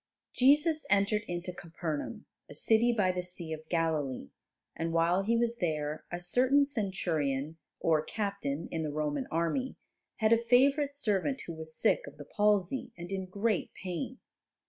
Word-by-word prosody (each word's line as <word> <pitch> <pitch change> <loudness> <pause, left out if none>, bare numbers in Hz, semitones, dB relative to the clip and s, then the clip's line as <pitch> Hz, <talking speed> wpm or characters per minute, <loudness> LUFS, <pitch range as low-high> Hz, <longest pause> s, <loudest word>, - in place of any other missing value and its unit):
Jesus 300 +5 +4
entered 205 +1 +3
into 175 +1 -4
Capernaum, 165 -3 -5 0.2
a - - -10
city 230 +2 +3
by 205 -6 +2
the 180 0 -2
Sea 175 -2 -3
of 155 0 -9
Galilee, 155 - -1 0.4
and 165 0 -2
while 170 +3 +3
He 230 +4 +1
was 235 0 0
there 155 -4 -2
a 175 - -3
certain 255 +10 +3
Centurion, 165 - -1 0.2
or 160 -2 +3
captain 200 -7 -3
in 165 - -2
the 155 - -2
Roman 145 -2 -2
army, 170 - -1 0.4
had 220 0 +3
a 230 0 +2
favourite 275 +4 +4
servant 235 +1 0
who 170 - -6
was 160 0 -6
sick - - +2
of - - -11
the - - -9
palsy 210 +2 +1
and 175 +2 -8
in 190 -1 -3
great 200 +2 -1
pain. 180 -4 -5
180 Hz, 160 wpm, -31 LUFS, 160-230 Hz, 0.4 s, Jesus